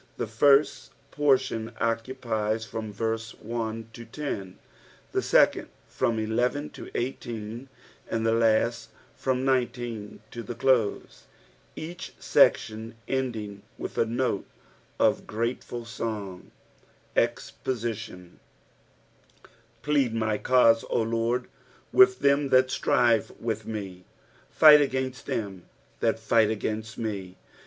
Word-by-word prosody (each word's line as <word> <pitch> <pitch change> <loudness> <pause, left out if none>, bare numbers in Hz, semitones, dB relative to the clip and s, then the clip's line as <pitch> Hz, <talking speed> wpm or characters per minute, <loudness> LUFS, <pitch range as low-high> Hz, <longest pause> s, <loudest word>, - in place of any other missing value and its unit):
The - - -1
first 140 +6 +3 0.2
portion, 130 -6 +1
oeatpiesfrom 115 -2 -2
verse 110 +1 -3
Ito 115 0 -5
10, 100 -11 -5 0.5
the - - 0
second - - +3 0.2
from 115 - 0
11 120 +7 -1
to - - -10
18, 120 -1 -4 0.4
and 115 0 0
Ike 115 - +3
last 115 +1 +2 0.3
from 130 0 -1
10 120 -5 -2
to 120 - -6
the 120 0 -7
«lo«, 125 -6 +3 0.7
each 170 +2 -7
seeHon 110 +1 +2
en^ng 115 -7 -3 0.2
with - - -6
a - - +4
note 120 -3 -1 0.5
qf - - +2
grateful 115 +1 -3
song. 105 -5 -5 0.7
EXPoamON. 110 -7 -3 1.5
PLEAD 140 -6 +2
my 110 -2 0
cause, 115 -3 +4
O - - +1
LORD, 115 +2 0 0.5
with 385 0 +6
them 140 0 +3
that 130 0 +4
strive 115 -3 +2
with 110 -2 -3
me: 95 -4 -6 0.4
fight 150 -1 +8
against 130 -2 -2
them 100 -5 -4 0.3
that 115 -1 +1
fight 110 -1 +3
against 110 0 -3
me. 100 -5 -4
115 Hz, 105 wpm, -27 LUFS, 110-130 Hz, 1.5 s, fight